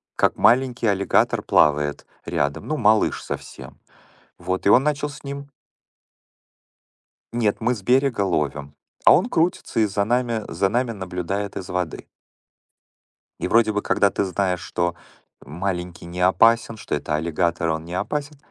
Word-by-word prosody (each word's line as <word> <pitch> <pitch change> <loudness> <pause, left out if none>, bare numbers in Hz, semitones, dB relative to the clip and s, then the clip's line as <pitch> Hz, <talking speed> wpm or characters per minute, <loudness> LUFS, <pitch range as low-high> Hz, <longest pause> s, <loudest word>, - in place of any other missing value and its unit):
как - - +2
маленький 125 -2 +3
аллигатор 100 -1 +2
плавает 75 0 +2 0.2
рядом. 70 0 -2
Ну, 155 - -1
малыш 110 -4 +2
совсем. - - -8 0.6
Вот, 95 0 -3
и - - +5
он 125 +6 +6
начал 150 0 -1
с 145 - -12
ним 140 0 -7 1.9
Нет, 110 -4 +1
мы 120 +3 +2
с 105 - -9
берега 125 0 +2
ловим. 70 -4 -2 0.3
А - - +8
он 175 - +1
крутится 165 - 0
и 110 - +4
за 100 0 -1
нами 120 0 0
за 95 - 0
нами 120 +3 0
наблюдает 95 0 -4
из 90 - -6
воды. 90 -3 -3 1.3
И - - -1
вроде 115 -1 +3
бы, 105 0 -1
когда 100 - +2
ты - - -1
знаешь, 95 -1 -1
что 85 0 -2 0.5
маленький 90 +2 -4
не 90 +1 -7
опасен, 115 +5 +3
что - - -4
это - - -2
аллигатор, 85 +1 -1
он 80 0 -2
не 85 +1 -7
опасен. 145 +8 -3
100 Hz, 150 wpm, -22 LUFS, 90-120 Hz, 1.9 s, А